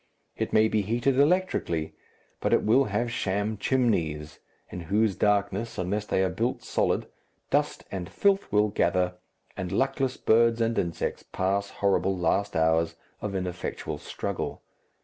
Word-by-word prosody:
It - - -2
may 110 0 +5
be 110 -1 +1
heated 120 +6 +1
electrically, 145 - +1 0.5
but - - 0
it - - +4
will 130 +6 +4
have 115 +3 -1
sham 105 -1 -1
chimneys, 85 - 0 0.3
in 90 - -5
whose 105 0 +2
darkness, 105 +2 0
unless 100 +4 -2
they 95 - +2
are 95 - +1
built 120 +6 -2
solid, - - 0 0.5
dust - - +1
and 90 -3 -4
filth 200 -1 +1
will 105 0 +3
gather, 90 -1 +1 0.4
and 90 -2 -4
luckless 135 -1 0
birds 115 +1 +3
and 115 0 +1
insects 85 -1 -2
pass 100 +2 0
horrible 95 -1 +1
last 95 +4 0
hours 80 +1 +2 0.3
of 100 -2 -3
ineffectual 90 -1 -4
struggle. - - -4
100 Hz, 145 wpm, -27 LUFS, 90-115 Hz, 0.5 s, may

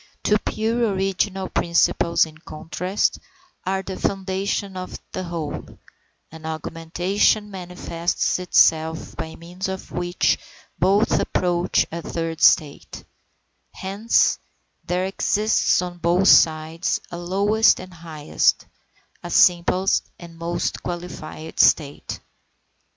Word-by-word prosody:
Two 210 0 +3
pure 225 -1 -1
original 190 0 -1
principles 170 -1 +2
in 155 0 -14
contrast, 180 +5 -2 0.5
are 190 0 0
the 190 - -6
foundation 195 +1 -2
of 185 0 -6
the 185 - -4
whole; 165 -4 -6 0.5
an 160 0 -12
augmentation 170 +6 0
manifests 180 -2 -2
itself 160 -2 +2
by 160 0 -6
means 175 +3 -6
of 190 0 -6
which 175 0 0 0.4
both 200 +4 +3
approach 175 -1 +1
a 170 +1 -4
third 165 -1 -4
state; 150 -4 +2 0.7
hence 200 +4 +1 0.4
there 180 +1 -1
exists 205 0 +1
on 175 -1 -7
both 175 +3 +2
sides 160 +2 +4
a 175 - -5
lowest 200 +5 +3
and 185 0 -10
highest, 160 -3 0 0.6
a - - -7
simplest 180 +2 +3
and 170 -1 -12
most 170 +1 -3
qualified 170 -2 -7
state. 145 -2 +2
180 Hz, 105 wpm, -22 LUFS, 165-190 Hz, 0.7 s, sides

